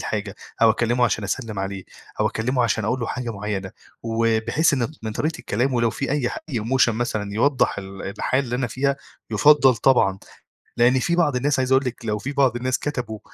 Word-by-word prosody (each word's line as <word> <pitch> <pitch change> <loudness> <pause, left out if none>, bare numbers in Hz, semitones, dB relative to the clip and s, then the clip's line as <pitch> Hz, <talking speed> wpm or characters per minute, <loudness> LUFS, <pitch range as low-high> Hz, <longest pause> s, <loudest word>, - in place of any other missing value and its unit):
حاجة 105 -1 -3 0.3
أو 115 - +7
أكلّمه 120 +2 +1
عشان 110 -3 0
أسلّم 110 +1 -3
عليه 95 0 -4 0.4
أو 105 - +3
أكلّمه 125 +4 0
عشان 110 -2 0
أقول 125 +4 -1
له 115 - -2
حاجة 125 -1 -4
معيّنة 100 -2 -4 0.3
وباحس 115 +7 +1
إن 120 -2 0
من 110 -1 -4
طريقة 160 +8 -2
كلامه 125 +3 +1
لو 115 -1 +2
في 140 - -4
أي 140 -4 0
حا - - -6
أي 120 -7 -2
emotion 120 +2 +2
مثلًا 110 -3 -2
يوضّح 130 0 +2
ال 95 0 -8
الحالة 130 +7 -1
اللي 125 -1 -3
أنا 125 - -1
فيها 140 +3 -1 0.3
يُفضّل 135 +2 +5
طبعًا، 105 -5 +3 0.6
لإن 125 +2 +4
في 170 +6 0
بعض 150 -6 +2
الناس 135 +2 +1
عايزة 130 0 +1
أقول 135 0 +2
لِك 120 -1 -5
لو 105 -1 -1
في 135 +7 -5
بعض 135 -4 +2
الناس 125 +1 -1
كتبوا 125 -7 -4
120 Hz, 205 wpm, -23 LUFS, 110-130 Hz, 0.6 s, أو